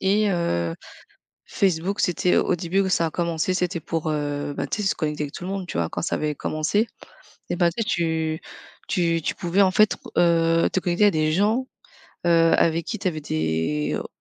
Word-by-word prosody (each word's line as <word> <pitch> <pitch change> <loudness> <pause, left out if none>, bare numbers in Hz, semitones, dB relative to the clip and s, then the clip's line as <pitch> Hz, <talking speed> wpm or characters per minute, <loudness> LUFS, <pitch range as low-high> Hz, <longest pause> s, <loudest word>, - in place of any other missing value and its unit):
Et 205 +2 +2
heu, 85 - 0 0.7
Facebook, 190 +1 0
c'était 180 0 +2
au - - +2
début 185 +3 0
où 190 - +1
ça 170 -2 +2
a - - -2
commencé 170 +1 -1
c'était 180 -2 -1
pour, 160 0 -2
heu, 145 -1 -2
bah, - - -2
tu 210 - -3
sais, 195 - +1
se - - +1
connecter 150 -1 -2
avec 145 - -8
tout 175 - -7
le 185 - -4
monde, 195 -2 -3
tu 170 - -4
vois? 85 - 0
Quand - - -4
ça - - -1
avait 150 -1 -1
commencé. 160 +12 0 0.6
Et 175 - 0
ben, 175 -1 +3
tu 230 - 0
sais, - - -8
tu 160 -3 0 0.5
tu 165 -2 +1
tu - - -1
pouvais, 190 +2 +2
en 190 - +4
fait, 215 +2 +4
re - - -13
heu, 165 -1 +3
te 190 - 0
connecter 180 +4 +2
à - - +6
des 155 0 +1
gens, 215 +9 +1 0.6
heu, 165 -1 +5
avec 165 0 +2
qui 220 - -4
t'avais 175 -6 -2
des 80 - -1
o - - -6
170 Hz, 215 wpm, -24 LUFS, 155-190 Hz, 0.7 s, à